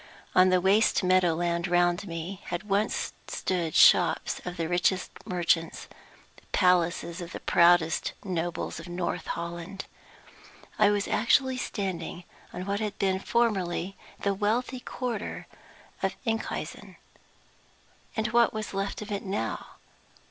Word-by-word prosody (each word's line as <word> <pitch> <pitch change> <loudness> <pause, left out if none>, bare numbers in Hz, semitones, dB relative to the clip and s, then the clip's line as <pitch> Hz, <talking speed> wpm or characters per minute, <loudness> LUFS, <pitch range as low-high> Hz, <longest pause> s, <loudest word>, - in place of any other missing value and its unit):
On 185 0 +6
the 185 0 +4
waste 200 +3 +3
meadow 180 -2 +4
land 170 +1 0
round 175 +2 +2
me 170 +3 -5
had 175 +2 -4
once 205 +1 0
stood 180 -3 -1
the 155 - -1
shops - - +5
of 180 0 -5
the 165 -1 -1
richest 180 +2 +1 0.2
merchants, 170 -2 0 0.5
the - - -18
palaces 175 -1 +2
of 175 +1 -7
the - - -5
proudest 170 -1 +3
nobles 175 -2 -3
of - - -9
North 175 0 -3
Holland. 170 +2 -5 0.9
I 210 -1 +6
was 205 -1 0
actually 260 +4 +2
standing 180 -7 -4 0.3
on 180 - -6
what 200 +1 -1
had 210 -2 -3
been 190 -1 +1
formerly 195 -5 0 0.2
the 200 - 0
wealthy 230 +6 -1
quarter 245 -4 -4 0.6
of - - 0
Enkhuizen! 225 -1 -3 1.2
And 220 0 +1
what 235 -1 +3
was 215 -2 -4
left 195 +2 -3
of 210 - -9
it 200 - -2
now? 190 - -3
185 Hz, 135 wpm, -28 LUFS, 175-205 Hz, 1.2 s, On